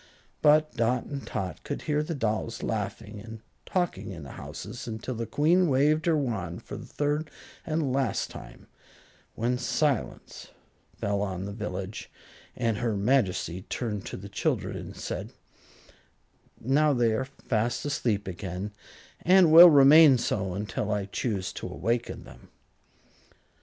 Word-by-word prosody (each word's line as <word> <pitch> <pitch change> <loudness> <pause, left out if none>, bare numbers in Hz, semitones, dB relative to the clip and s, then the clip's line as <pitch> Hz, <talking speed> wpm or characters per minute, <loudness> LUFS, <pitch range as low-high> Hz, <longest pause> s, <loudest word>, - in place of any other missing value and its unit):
But 155 -1 +4
Dot 120 +1 +1
and 140 -1 -6
Tot 90 -4 -4
could - - -5
hear 150 -1 0
the 155 +2 -3
dolls 115 -2 -2
laughing 105 0 -4
and 115 -1 -10 0.3
talking 175 - -1
in 85 -5 -8
the 70 - -9
houses 120 +7 -8
until 110 +3 -4
the 115 -1 -4
Queen 175 +5 +3
waved 150 +3 +2
her 165 -2 +4
wand 110 - -3
for - - -8
the - - -9
third 150 +2 -1 0.4
and 155 -5 0
last 135 -3 0
time, - - -11 0.7
when 120 +2 0
silence 140 0 -2 0.5
fell 100 0 -1
on 95 -2 -3
the 100 - -5
village, 100 0 -5 0.5
and 115 -4 0
her 115 -2 -1
Majesty 100 -6 +1
turned 105 -5 -3
to - - -6
the 100 - -9
children 100 - -1
and - - -8
said: - - -5 1.3
"Now 145 +4 +3
they 120 -3 +2
are 130 +4 -1
fast 120 -3 -2
asleep 110 -8 -1
again, 95 +2 -5 0.5
and 180 -2 +5
will 170 +2 +11
remain 145 -1 +8
so 95 -6 -2
until 105 +1 -3
I 105 -1 -1
choose 100 -2 -3
to - - -6
awaken 115 +4 -2
them." - - -15
115 Hz, 145 wpm, -27 LUFS, 100-145 Hz, 1.3 s, will